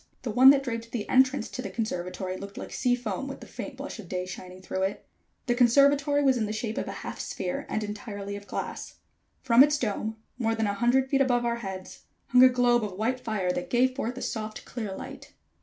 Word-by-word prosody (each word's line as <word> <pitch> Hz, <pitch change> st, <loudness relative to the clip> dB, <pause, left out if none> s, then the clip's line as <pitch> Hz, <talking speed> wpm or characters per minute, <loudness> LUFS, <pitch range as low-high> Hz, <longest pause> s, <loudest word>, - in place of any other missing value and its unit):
The 235 Hz, -, -2 dB
one 255 Hz, +4 st, +8 dB
that 275 Hz, 0 st, +5 dB
draped 230 Hz, -3 st, -4 dB
the 225 Hz, -4 st, -3 dB
entrance 260 Hz, +1 st, +3 dB
to 255 Hz, -, -5 dB
the -, -, -5 dB
conservatory 185 Hz, -4 st, -3 dB
looked 200 Hz, +1 st, -9 dB
like -, -, -7 dB
sea 250 Hz, -1 st, +2 dB
foam 245 Hz, +1 st, -4 dB
with 275 Hz, -, -7 dB
the -, -, -10 dB
faint 280 Hz, -3 st, -8 dB
blush 275 Hz, -3 st, -7 dB
of 185 Hz, -6 st, -10 dB
day 180 Hz, -1 st, -2 dB
shining 185 Hz, 0 st, -9 dB
through 190 Hz, 0 st, -4 dB
it. 195 Hz, +2 st, -2 dB, 0.4 s
The 245 Hz, -, +2 dB
conservatory 280 Hz, +4 st, +4 dB
was 265 Hz, -2 st, +4 dB
in 220 Hz, -3 st, 0 dB
the -, -, -3 dB
shape 220 Hz, 0 st, -3 dB
of -, -, -4 dB
a -, -, -3 dB
half -, -, -6 dB
sphere, 180 Hz, -1 st, -4 dB
and 215 Hz, -, -1 dB
entirely 205 Hz, -1 st, -5 dB
of 205 Hz, 0 st, -9 dB
glass. -, -, -5 dB, 0.5 s
From 245 Hz, 0 st, +7 dB
its 295 Hz, +1 st, +2 dB
dome, 220 Hz, -2 st, -2 dB, 0.2 s
more 225 Hz, -2 st, +1 dB
than 225 Hz, -1 st, 0 dB
a 200 Hz, -, 0 dB
hundred 245 Hz, +5 st, +2 dB
feet 275 Hz, 0 st, +2 dB
above 245 Hz, -2 st, +2 dB
our 235 Hz, 0 st, 0 dB
heads, 190 Hz, -4 st, -8 dB, 0.2 s
hung 250 Hz, +1 st, +6 dB
a 260 Hz, -, +9 dB
globe 245 Hz, -2 st, +3 dB
of 205 Hz, -3 st, -4 dB
white 245 Hz, +5 st, 0 dB
fire 205 Hz, -7 st, -1 dB
that 180 Hz, -, -4 dB
gave 255 Hz, +1 st, +2 dB
forth 250 Hz, -2 st, -3 dB
a -, -, -5 dB
soft 215 Hz, -1 st, -4 dB
clear 215 Hz, -5 st, -5 dB
light. -, -, -9 dB
230 Hz, 230 wpm, -27 LUFS, 205-255 Hz, 0.5 s, a